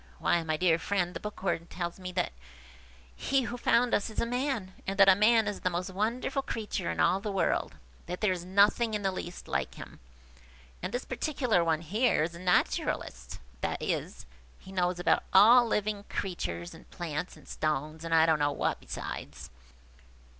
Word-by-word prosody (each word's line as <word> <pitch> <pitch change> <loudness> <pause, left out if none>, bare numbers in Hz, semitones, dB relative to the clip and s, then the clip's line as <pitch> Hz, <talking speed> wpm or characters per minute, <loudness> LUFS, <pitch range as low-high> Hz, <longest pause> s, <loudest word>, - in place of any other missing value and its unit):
Why, 170 - +2
my 155 -1 -1
dear 170 -1 +3
friend, 180 -1 -1
the - - -5
Bookworm 190 -5 -3
tells 175 0 -5
me 180 -1 -6
that 180 - -1 0.8
he 270 - +1
who 240 +1 -4
found 240 0 +2
us 205 - +1
is 220 - -4
a - - +1
man, 245 -6 -2
and 195 0 -2
that 195 -1 +7
a 195 - +9
man 220 +2 +4
is 205 - -3
the 185 - 0
most 180 +2 -3
wonderful 230 +8 -1
creature 215 -8 -3
in - - -3
all 190 - +3
the 205 +1 -4
world; 195 - 0 0.3
that 180 - -4
there 210 -4 +2
is 175 -1 -5
nothing 205 +4 +3
in 205 - -3
the 195 - +1
least 180 -1 -7
like - - -2
him. - - -11 0.8
And - - -3
this 245 - -3
particular 250 - 0
one 160 -1 +1
here 205 +1 +2
is 170 +2 -3
a 170 - -9
naturalist; 65 - 0 0.2
that - - -2
is, - - -3 0.3
he 190 - -13
knows 180 -1 0
all - - -2 0.2
about 235 +5 +6
living 210 -1 -1
creatures, 85 - -4
and - - -15
plants, 170 0 -5
and - - -18
stones, 155 +1 -2
and 165 - -5
I 160 -1 +6
don't 160 -2 +3
know 145 0 +2
what - - -1
besides. - - -7
190 Hz, 190 wpm, -29 LUFS, 170-215 Hz, 0.8 s, a